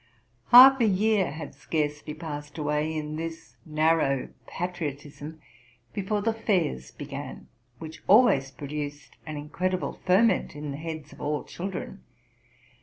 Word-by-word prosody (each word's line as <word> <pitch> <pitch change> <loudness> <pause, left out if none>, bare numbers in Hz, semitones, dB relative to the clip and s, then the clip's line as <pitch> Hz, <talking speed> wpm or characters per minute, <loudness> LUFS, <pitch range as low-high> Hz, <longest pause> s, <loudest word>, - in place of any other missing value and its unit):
Half 260 +2 +10
a 225 - +5
year 205 0 +2
had 150 +1 -7
scarcely 150 -1 -3
passed 150 -2 -7
away 150 +1 0
in 155 -1 -4
this 165 0 -7
narrow 155 -3 +2 0.2
patriotism 155 -3 -5 0.5
before 205 +1 -1
the 225 +1 +1
fairs 180 - 0
began, - - -8 0.3
which 160 +3 -9
always 195 - +5
produced 145 +1 -7
an 155 -1 -5
incredible 180 +5 -2
ferment 190 -3 +3
in 145 -1 -5
the 140 - -5
heads 155 -2 -7
of - - -13
all 150 0 -1
children. 190 +1 -6
155 Hz, 125 wpm, -27 LUFS, 145-185 Hz, 0.5 s, Half